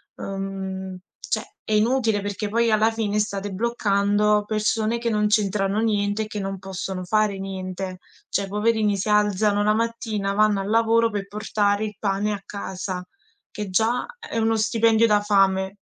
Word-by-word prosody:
uhm, 190 -1 -5 0.2
cioè, - - -2 0.2
è 215 - -3
inutile 220 -1 +2
perché 205 +1 -3
poi 230 +1 +2
alla 215 +1 +4
fine 210 -2 -1
state 200 -1 -2
bloccando 210 -1 +2
persone 215 +1 0
che 235 0 -2
non 210 -1 +2
c'entrano 210 0 +1
niente 205 -1 +1
e - - -7
che 210 -1 -5
non 195 0 -3
possono 190 0 -5
fare 210 +1 +1
niente. 185 -1 -5 0.3
Cioè, 200 0 -1
poverini, 210 0 +1
si 205 +3 -2
alzano 210 0 +3
la 210 0 +3
mattina, 220 -3 -1
vanno 210 -1 +3
al 195 - -4
lavoro 230 +1 +3
per 200 -1 -4
portare 205 0 0
il 210 -2 -6
pane 205 +1 0
a 200 - -5
casa, 190 -2 -5 0.5
che 210 -3 -5
già 220 +6 +1
è 340 - -6
uno 225 0 +2
stipendio 225 0 +3
da 210 -2 +4
fame 195 -1 +2
210 Hz, 160 wpm, -23 LUFS, 195-220 Hz, 0.5 s, alla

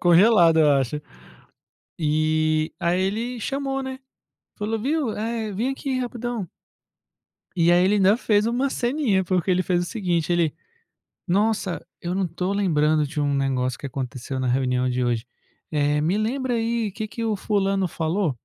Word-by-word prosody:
congelado 175 -1 +6
eu 150 -2 +5
acho. 135 +1 0 1.0
E, 155 0 +1
aí 175 0 +1
ele 230 +5 -2
chamou 270 +2 -2
n 265 0 -4
é, - - -11 0.6
falou 220 +1 -1
viu, 275 +1 0 0.4
vem 235 +7 0
aqui 270 -1 -2
rapidão. 240 -5 -4 1.1
E 170 -1 +4
aí 175 +1 +5
ele 195 +3 +3
ainda 200 +2 +4
fez 210 -3 +2
uma 245 +4 +1
ceninha, 245 -7 +1
porque 180 0 0
ele 185 0 +3
fez 180 -1 +1
o - - -2
seguinte, 175 -5 -1
ele: 170 -3 +2 0.7
"Nossa, 200 0 0 0.2
eu 175 +1 -3
não 190 -1 0
tô 180 +3 -3
lembrando 155 -6 +2
de 145 +2 -4
um 145 -1 +1
negócio 130 -2 0
que - - -6
aconteceu 130 0 -5
na 130 - -1
reunião 125 0 +1
de 125 0 0
hoje, 120 -1 -1 0.4
eh, 150 -1 +1
me 165 +6 +1
lembra 250 +3 -1
aí 230 -1 0
que 215 +2 -4
que 230 +1 -5
o 220 -2 0
fulano 195 -2 0
falou?". 165 +2 -1
185 Hz, 165 wpm, -24 LUFS, 155-225 Hz, 1.1 s, congelado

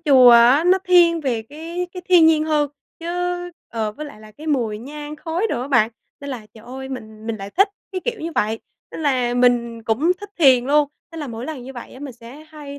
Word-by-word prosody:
chùa 265 -6 +7
á, 240 +7 +6
nó 370 +1 +5
thiên 345 -2 +5
về 250 -6 -1
cái 330 +8 -6
cái 365 -1 -7
thiên 345 -3 +7
nhiên 315 -1 +4
hơn, 300 -2 +1 0.3
chứ 330 - -7 0.6
ờ, 220 -2 -3
với 300 +7 -7
lại 215 -7 -12
là 215 0 -14
cái 305 +9 -12
mùi 235 -8 0
nhang 295 +4 -8
khói 335 +7 -2
đồ 240 - -1
á 260 - -6
bạn, 235 -5 +3 0.3
nên 280 - -6
là 235 -5 -6
trời 220 0 -14
ơi! 265 +2 -8
Mình 220 -4 -8
mình 230 - -2
lại 200 -1 -8
thích 395 - +3 0.2
cái 370 - -3
kiểu 475 -2 -3
như 330 +1 -4
vậy. 220 +2 0 0.3
Nên 320 - -7
là 250 -4 +1
mình 240 -2 +2
cũng 255 +11 +2
thích 410 - -9
thiền 260 -5 +6
luôn, 290 +1 +3 0.2
nên 325 - -6
là 290 - -4
mỗi 230 +1 -6
lần 305 -5 -6
như 260 +2 -9
vậy 245 -1 -10
á 260 - -12
mình 285 -2 -6
sẽ 245 +6 -13
hay 290 -2 -9
275 Hz, 240 wpm, -21 LUFS, 235-315 Hz, 0.6 s, chùa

